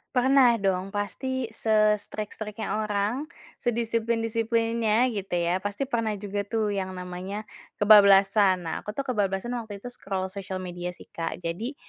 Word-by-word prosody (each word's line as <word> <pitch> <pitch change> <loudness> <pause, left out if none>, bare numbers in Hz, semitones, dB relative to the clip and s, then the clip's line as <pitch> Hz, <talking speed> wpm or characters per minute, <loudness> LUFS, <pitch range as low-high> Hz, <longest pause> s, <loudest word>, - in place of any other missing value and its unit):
Pernah 255 -1 +5
dong 195 -3 0
pasti 230 +5 -3
se-strict-strict-nya 215 0 0
orang, 215 +6 -1 0.3
sedisiplin-disiplinnya 230 0 +1
gitu 195 -4 -3
ya, 175 +2 +1
pasti 205 +6 -3
pernah 230 -5 -1
juga 200 0 -4
tuh 215 -2 0
yang 190 -2 -3
namanya 180 +3 -5 0.3
kebablasan. 200 -2 +6
Nah 165 - -2
aku 210 - -7
tuh 275 - -1
kebablasan 205 -3 -1
waktu 205 -3 -8
itu 245 - -6
scroll 190 -5 -3
sosial 190 -1 -5
media 175 -1 -5
sih, - - -14
Kak. 165 +1 -4
Jadi 215 +12 -3
210 Hz, 135 wpm, -26 LUFS, 195-230 Hz, 0.3 s, kebablasan